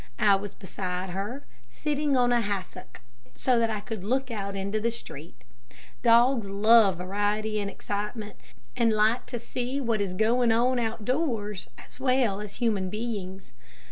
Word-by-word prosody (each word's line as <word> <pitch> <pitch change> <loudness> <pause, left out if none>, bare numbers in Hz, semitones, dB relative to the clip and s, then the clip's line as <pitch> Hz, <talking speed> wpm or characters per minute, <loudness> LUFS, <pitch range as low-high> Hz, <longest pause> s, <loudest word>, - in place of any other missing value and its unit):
I 205 -2 +5
was 200 +1 -5
beside 185 -1 -4
her, 205 +9 -4 0.2
sitting 290 - 0
on 245 -1 +3
a 240 -1 +3
hassock, 195 - -5 0.3
so 250 -2 +2
that 230 -1 +2
I 215 -2 -2
could 215 -2 -6
look 260 +4 -1
out 200 -3 -4
into 200 +2 -2
the 230 +2 +1
street. 155 - -9 0.6
Dogs 235 -2 +4
love 205 -1 +5
variety 205 +3 -1
and 200 -1 -2
excitement, 210 +2 -5 0.4
and 230 -1 +3
like 215 +3 +2
to 245 - -4
see 250 +3 -3
what 230 -5 0
is 190 -2 -2
going 230 +3 +3
on 245 +3 +3
out 225 -2 -3
doors 230 - -1
as - - -14
well 255 -6 +2
as 210 -1 -8
human 210 -6 0
beings. 195 - -5
215 Hz, 160 wpm, -27 LUFS, 200-240 Hz, 0.6 s, I